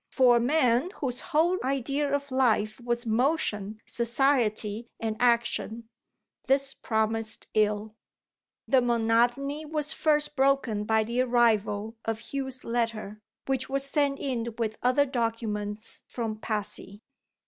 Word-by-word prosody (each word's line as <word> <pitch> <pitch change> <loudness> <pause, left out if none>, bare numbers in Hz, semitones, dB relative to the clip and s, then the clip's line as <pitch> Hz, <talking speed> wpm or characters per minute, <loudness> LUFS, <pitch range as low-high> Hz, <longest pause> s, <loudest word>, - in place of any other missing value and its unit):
For 250 -2 +5
a - - +3
man 250 +2 +2
whose 250 -3 -3
whole 345 +3 +1
idea 275 +2 0
of 285 0 -2
life 225 -4 +1
was 240 0 -1
motion, 220 -4 0
society, 235 -3 +1
and 220 -1 -2
action, 235 -1 +1 0.6
this 270 0 +2
promised 220 -1 -1
ill. 210 0 +1 0.7
The 265 -2 +4
monotony 240 +5 +1
was 305 0 -1
first 300 -1 +1
broken 265 -6 +2
by 220 0 +3
the 235 +3 0
arrival 225 -3 +1
of 225 +3 -5
Hugh's 265 -2 -4
letter, 225 -3 -2 0.2
which 265 -1 -1
was 275 0 +1
sent 280 -1 +1
in 235 -5 -3
with 220 -2 -1
other 255 +3 +3
documents 225 -4 -3
from 225 -3 -4
Passy. 210 -1 -4
235 Hz, 125 wpm, -28 LUFS, 220-270 Hz, 0.7 s, For